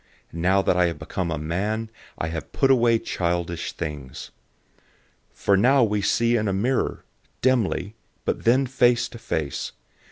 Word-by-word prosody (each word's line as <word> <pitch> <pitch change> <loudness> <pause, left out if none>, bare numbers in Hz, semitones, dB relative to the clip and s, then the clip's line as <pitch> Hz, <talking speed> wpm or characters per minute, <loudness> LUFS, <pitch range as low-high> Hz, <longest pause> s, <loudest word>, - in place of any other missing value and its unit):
Now 95 +4 +2
that - - +2
I 90 -1 +4
have 85 - -3
become 90 -3 -4
a 80 - -2
man, 105 +9 -2 0.3
I 80 - -2
have 80 -1 -6
put 135 -1 +3
away 120 -3 +4
childish 85 -4 -2
things. 70 -4 -6 1.0
013:012 - - -30
For 100 - +3
now 125 +6 +4
we 105 -2 +1
see 115 +4 +2
in 110 -2 0
a 100 - 0
mirror, 120 +7 -1 0.4
dimly, 115 -5 +1 0.3
but - - -1
then 130 +4 +4
face 125 -2 +3
to 120 - -11
face. 75 - -3
100 Hz, 160 wpm, -24 LUFS, 85-120 Hz, 1.0 s, I